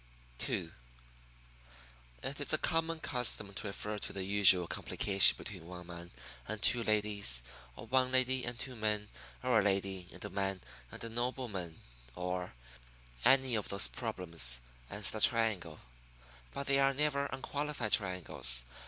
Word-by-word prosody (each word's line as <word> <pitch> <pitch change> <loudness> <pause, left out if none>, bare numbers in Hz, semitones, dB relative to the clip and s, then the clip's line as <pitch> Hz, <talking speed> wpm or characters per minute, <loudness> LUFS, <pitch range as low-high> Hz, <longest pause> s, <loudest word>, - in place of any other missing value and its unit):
II - - -2 1.5
It 140 - -4
is 145 - +2
a - - +4
common 165 0 0
custom 120 -7 -1
to 105 +2 -5
refer 105 +1 -5
to - - -1
the 95 - -4
usual 95 -2 +6
complication 95 +3 +4
between 90 -5 -8
one 90 0 -10
man 85 0 -10 0.4
and 110 0 -5
two 120 +2 +5
ladies, 105 - +1 0.3
or 110 - -10
one 130 +2 +1
lady 130 0 +2
and 120 0 -4
two 125 0 -4
men, 105 -2 -2 0.3
or 125 -3 +3
a - - +1
lady 95 -2 -1
and 90 - -10
a - - -5
man 95 -1 -3 0.3
and - - -8
a 115 - -4
nobleman, 115 -8 -5 0.3
or 90 -4 -5 0.7
well, 130 - +8
any 130 -2 -3
of 105 -2 -2
those 100 +1 +3
problems 85 - 0 0.3
as 105 -1 +2
the 110 - -4
triangle. 105 -10 +1 0.7
But 140 - -5
they 140 0 +1
are 135 0 +2
never 140 -1 0
unqualified 140 -3 -4
triangles. 90 - +3
105 Hz, 155 wpm, -32 LUFS, 90-125 Hz, 1.5 s, well